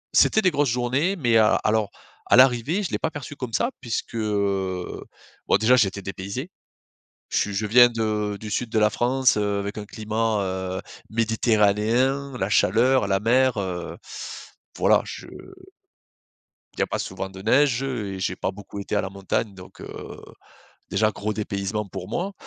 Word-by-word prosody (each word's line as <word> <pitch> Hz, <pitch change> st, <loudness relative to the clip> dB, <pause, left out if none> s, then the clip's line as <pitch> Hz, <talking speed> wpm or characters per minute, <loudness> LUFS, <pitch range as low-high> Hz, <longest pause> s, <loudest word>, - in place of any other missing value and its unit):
c'était 220 Hz, -, +5 dB
des 185 Hz, -, +4 dB
grosses 145 Hz, -2 st, +1 dB
journées, 130 Hz, +10 st, 0 dB
mais 120 Hz, -9 st, +2 dB
a 110 Hz, -1 st, +5 dB
alors 110 Hz, -1 st, +1 dB, 0.4 s
à -, -, +5 dB
l'arrivée, 130 Hz, -, +4 dB
je -, -, -3 dB
l'ai -, -, -1 dB
pas 160 Hz, -, 0 dB
perçu 145 Hz, -1 st, -8 dB
comme 125 Hz, -4 st, -6 dB
ça. 240 Hz, +3 st, +1 dB
Puisque, 120 Hz, 0 st, -4 dB
heu, 100 Hz, -4 st, -1 dB, 0.4 s
bon, -, -, +4 dB
déjà, 110 Hz, +5 st, +4 dB
j'étais 100 Hz, -4 st, +1 dB
dépaysé. 100 Hz, -, -5 dB, 0.8 s
Je -, -, -1 dB
suis 105 Hz, -, -1 dB
je 105 Hz, +2 st, -1 dB
viens 120 Hz, +3 st, +7 dB
de 105 Hz, -3 st, -1 dB
du 110 Hz, -1 st, -7 dB
Sud 120 Hz, +3 st, -1 dB
de 110 Hz, -, -1 dB
la 105 Hz, 0 st, +4 dB
France, 130 Hz, +1 st, +2 dB
heu, 105 Hz, -1 st, 0 dB
avec 100 Hz, +1 st, -4 dB
un 105 Hz, -, -7 dB
climat, 110 Hz, 0 st, -1 dB
heu, 95 Hz, 0 st, -3 dB, 0.3 s
méditerranéen, 115 Hz, +4 st, +1 dB
la 95 Hz, +1 st, -1 dB
chaleur, 115 Hz, +4 st, +3 dB
la 95 Hz, -1 st, +2 dB
mer, 125 Hz, +3 st, +3 dB
heu, 90 Hz, -3 st, -4 dB, 0.8 s
voilà. -, -, +4 dB
Je -, -, -8 dB, 1.5 s
il -, -, -8 dB
y -, -, +4 dB
a -, -, -2 dB
pas -, -, -3 dB
souvent 95 Hz, -, -4 dB
de 95 Hz, 0 st, -10 dB
neige, 130 Hz, +4 st, +3 dB
heu, 115 Hz, -7 st, -3 dB
et -, -, -7 dB
j'ai 95 Hz, -, -1 dB
pas -, -, -2 dB
beaucoup 100 Hz, +1 st, -9 dB
été 100 Hz, -, -3 dB
à -, -, +2 dB
la 95 Hz, -, -4 dB
montagne. 100 Hz, +2 st, -2 dB
Donc, 90 Hz, 0 st, -13 dB
heu, -, -, -8 dB, 0.7 s
déjà, 110 Hz, +2 st, +2 dB
gros 105 Hz, +1 st, -3 dB
dépaysement 105 Hz, 0 st, -3 dB
pour 95 Hz, -1 st, -7 dB
moi, 190 Hz, +3 st, -2 dB
110 Hz, 180 wpm, -24 LUFS, 100-125 Hz, 1.5 s, viens